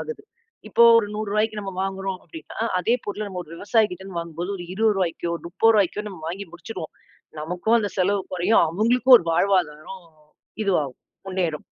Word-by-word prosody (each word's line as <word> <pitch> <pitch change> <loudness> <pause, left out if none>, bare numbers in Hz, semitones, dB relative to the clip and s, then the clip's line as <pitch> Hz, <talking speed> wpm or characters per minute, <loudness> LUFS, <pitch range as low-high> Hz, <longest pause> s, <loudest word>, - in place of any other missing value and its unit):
ஆகுது. 465 - -6 0.5
இப்போ 235 - +4 0.2
ஒரு 210 - 0
ரூ.100க்கு 215 +1 -1
நம்ம 195 -1 -5
வாங்குறோம் 195 -1 -3
அப்டினா 325 - -11 0.2
அதே 200 +7 +2
பொருள 205 +1 -4
நம்ம 185 -2 -5
ஒரு 160 - -14
விவசாயி 210 +3 +2
கிட்ட 180 +1 -8
இருந்து 185 -3 -6
வாங்கும்போது 170 +3 -5
ஒரு 175 - -7
ரூ.20க்கோ, 190 -5 0 0.2
ரூ.30க்கோ 210 +1 +2
நம்ம 185 -5 -10
வாங்கி 195 +4 -5
முடிச்சிருவோம். 175 -1 -8 0.5
நமக்கும் 180 +9 +1
அந்த 205 - -1
செலவு 195 +2 +2
குறையும். 180 +5 +3
அவுங்களுக்கும் 245 +8 +5
ஒரு 170 - -9
வாழ்வாதாரம் 180 -1 0 0.6
இது 200 - +2
ஆகும். 130 -2 -9 0.3
முன்னேறும். 180 -5 -2
195 Hz, 160 wpm, -23 LUFS, 175-215 Hz, 0.6 s, அவுங்களுக்கும்